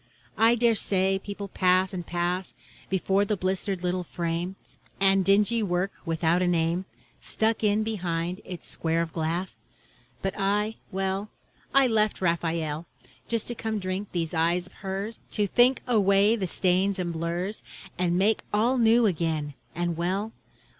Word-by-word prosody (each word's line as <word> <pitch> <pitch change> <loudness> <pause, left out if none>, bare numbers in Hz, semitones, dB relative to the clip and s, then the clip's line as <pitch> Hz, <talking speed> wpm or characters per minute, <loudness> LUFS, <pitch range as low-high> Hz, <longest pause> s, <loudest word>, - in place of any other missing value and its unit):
I 225 +2 +6
dare 235 0 +3
say 195 -2 +2
people 200 0 -6
pass 185 0 +2
and 180 -2 -4
pass 175 +2 -2 0.3
Before 190 +1 +2
the 205 0 -1
blistered 190 0 -2
little 180 0 0
frame, 170 +1 -3 0.4
And 195 0 +4
dingy 210 +4 +3
work 185 -1 0 0.2
without 165 +2 +1
a 180 - +2
name 170 +1 +1 0.4
Stuck 220 0 0
in 210 +1 +3
behind 180 -3 -2
its 180 -2 -8
square 165 0 0
of 165 - -8
glass. 170 +3 -2 0.7
But 195 - -1
I, 210 +2 0
well, 195 +2 -2 0.4
I 275 0 +5
left 215 -3 +1
Raphael 165 -2 -1 0.4
Just 230 -2 0
to - - -2
come 220 -1 -3
drink 185 +1 -3
these 165 -2 -2
eyes 170 +2 +1
of - - -17
hers, 195 +3 -5
To 210 - +2
think 245 +6 +4
away 205 -2 +4
the 195 -5 -2
stains 190 +3 +1
and 175 -2 -2
blurs 170 +5 -3 0.4
And 175 -1 +2
make 210 +4 +3
all 235 +5 +2
new 230 +1 +5
again 160 -6 -1 0.2
and 175 0 -1
well. 190 +6 -1
190 Hz, 155 wpm, -27 LUFS, 175-210 Hz, 0.7 s, I